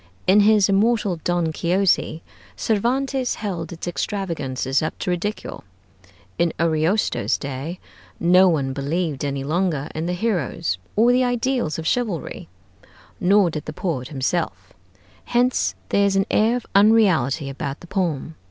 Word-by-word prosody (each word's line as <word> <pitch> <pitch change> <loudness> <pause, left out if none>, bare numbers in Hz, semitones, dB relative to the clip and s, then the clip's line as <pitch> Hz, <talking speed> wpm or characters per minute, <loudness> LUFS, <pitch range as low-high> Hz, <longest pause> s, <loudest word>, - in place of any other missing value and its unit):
In 190 +3 +5
his 210 -1 +5
immortal 205 -2 +2
'Don 175 -2 0
Quixote,' 175 -1 +1 0.3
Cervantes 255 +4 0
held 175 -6 -4
its 170 +1 -7
extravagances 150 -9 -2
up 155 - -3
to 180 - -2
ridicule. 205 +5 -4 0.8
In 170 -1 +2
Ariosto's 165 +5 +1
day 140 +5 -5 0.4
no 180 +2 +5
one 140 -5 0
believed 145 +2 -2
any 140 -1 -2
longer 155 -1 -1
in 160 +2 -3
the 180 - -1
heroes 175 - -1 0.2
or 230 +3 +5
the 250 +1 +3
ideals 245 - 0
of 160 - -5
chivalry, 195 - -2 0.7
nor 190 -1 +4
did 155 -2 -5
the 155 - -6
poet 145 -8 -3
himself; 145 +5 -3 0.5
hence 240 - +1
there 200 - +3
is 195 - 0
an 195 0 +2
air 225 +3 +3
of 245 - -4
unreality 190 - +4
about 135 +1 -5
the - - -11
poem. 170 -5 -2
175 Hz, 140 wpm, -22 LUFS, 155-210 Hz, 0.8 s, In